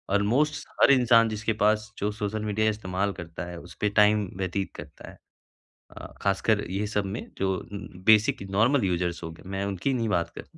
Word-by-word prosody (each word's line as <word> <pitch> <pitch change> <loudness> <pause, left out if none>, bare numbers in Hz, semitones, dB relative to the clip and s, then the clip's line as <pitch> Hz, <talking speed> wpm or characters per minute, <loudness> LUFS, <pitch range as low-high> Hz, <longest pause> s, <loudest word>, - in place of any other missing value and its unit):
Almost 130 +10 +1
हर - - +7
इंसान 120 -3 +5
जिसके 110 +1 -2
पास 110 +1 +2
जो 105 +1 -1
सोशल 105 0 -3
मीडिया 110 +1 +1
इस्तेमाल 100 -2 -2
करता 85 0 -7
है, 90 0 -8
उस 85 - -13
पे 105 - +2
टाइम 105 -1 +4
व्यतीत 95 +1 -2
करता 75 0 -10
है। - - -14 0.8
अ, - - -8 0.2
खासकर 100 +2 +1
ये 100 +3 -1
सब 105 -1 -1
में - - -5 0.2
जो 95 0 +1
उम, 100 -1 -8 0.2
बेसिक 110 -2 +5 0.2
नॉर्मल 125 +2 +3
युज़र्स 90 -2 -1
होंगे, 80 0 -8
मैं 95 +1 -3
उनकी 100 +7 -1
नहीं 115 -3 -1
बात 85 -5 0
कर - - -8
105 Hz, 185 wpm, -26 LUFS, 95-110 Hz, 0.8 s, हर